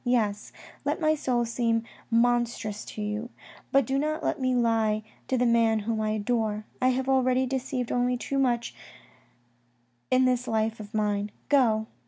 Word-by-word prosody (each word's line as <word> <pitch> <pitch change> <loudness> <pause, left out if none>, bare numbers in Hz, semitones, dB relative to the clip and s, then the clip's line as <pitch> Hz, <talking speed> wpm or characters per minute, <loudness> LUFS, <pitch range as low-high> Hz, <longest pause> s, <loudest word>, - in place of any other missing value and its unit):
Yes, 215 -5 0 0.3
let - - -1
my 310 -2 +3
soul 250 -5 0
seem 230 -1 0 0.3
monstrous 235 -3 +1
to 215 - -6
you, 210 +3 -3 0.4
but 275 -2 +4
do 270 +3 0
not 310 +2 -1
let - - -1
me 255 -1 +1
lie 225 -3 +2 0.2
to 260 - +1
the 250 - +2
man 230 -2 +3
whom 220 +1 -1
I 215 - 0
adore. 215 -1 -1 0.2
I 255 - +4
have 260 +1 0
already 260 -1 +3
deceived 255 -1 -2
only 245 0 +1
too 275 +2 -2
much 240 -3 +1 1.4
in 255 0 +4
this 250 -1 +1
life 220 0 0
of 210 +1 -9
mine. 205 -1 0 0.2
Go 230 -6 +3
240 Hz, 165 wpm, -27 LUFS, 220-255 Hz, 1.4 s, but